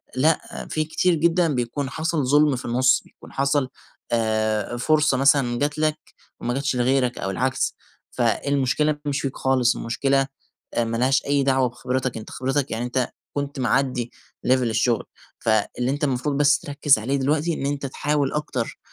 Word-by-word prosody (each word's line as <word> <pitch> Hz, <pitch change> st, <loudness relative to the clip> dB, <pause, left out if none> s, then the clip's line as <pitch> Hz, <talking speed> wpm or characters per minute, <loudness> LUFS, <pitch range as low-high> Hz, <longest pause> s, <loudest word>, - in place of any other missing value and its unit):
لأ، 155 Hz, +5 st, 0 dB
في 155 Hz, -, 0 dB
كتير 175 Hz, +3 st, +1 dB
جدًا 170 Hz, +2 st, +2 dB
بيكون 125 Hz, +3 st, -2 dB
حصل 160 Hz, -1 st, -1 dB
ظلم 145 Hz, 0 st, +4 dB
في 125 Hz, -, -7 dB
النص، 125 Hz, +2 st, +3 dB
بيكون -, -, -16 dB
حصل 140 Hz, -1 st, +1 dB, 0.4 s
آآ، 110 Hz, 0 st, 0 dB
فرصة 150 Hz, +1 st, +2 dB
مثلًا 135 Hz, -3 st, +3 dB
جات 145 Hz, +1 st, -1 dB
لك 155 Hz, 0 st, +1 dB, 0.4 s
وما 120 Hz, -, -2 dB
جاتش 140 Hz, +1 st, -1 dB
لغيرك 125 Hz, 0 st, +1 dB
أو 95 Hz, -, -3 dB
العكس، 130 Hz, +7 st, -1 dB, 0.4 s
فالمشكلة 140 Hz, +5 st, +1 dB
مش 140 Hz, -1 st, -1 dB
فيك 135 Hz, -1 st, -4 dB
خالص، 130 Hz, -2 st, +2 dB
المشكلة 135 Hz, +4 st, 0 dB, 0.5 s
آآ، 120 Hz, -, +1 dB
مالهاش 125 Hz, +4 st, +1 dB
أي 140 Hz, -1 st, +2 dB
دعوة 130 Hz, -2 st, +2 dB
بخبرتك، 125 Hz, 0 st, -3 dB
أنت 110 Hz, -, -8 dB
خبرتك 135 Hz, +2 st, -1 dB
يعني 115 Hz, +2 st, -2 dB
أنت 125 Hz, 0 st, -1 dB, 0.2 s
كنت 140 Hz, -1 st, -3 dB
معدّي 125 Hz, 0 st, 0 dB, 0.4 s
level -, -, +3 dB
الشغل، 115 Hz, 0 st, +1 dB, 0.3 s
فاللي 115 Hz, +3 st, 0 dB
أنت 145 Hz, +2 st, -3 dB
المفروض 140 Hz, +1 st, 0 dB
بس 145 Hz, -1 st, +4 dB
تركز 145 Hz, -2 st, +2 dB
عليه 125 Hz, +6 st, -1 dB
دلوقتي 150 Hz, +5 st, +1 dB
إن 140 Hz, -, -3 dB
أنت 140 Hz, 0 st, -2 dB
تحاول 145 Hz, 0 st, -1 dB
أكتر، 150 Hz, -6 st, -3 dB
135 Hz, 160 wpm, -23 LUFS, 125-145 Hz, 0.5 s, ظلم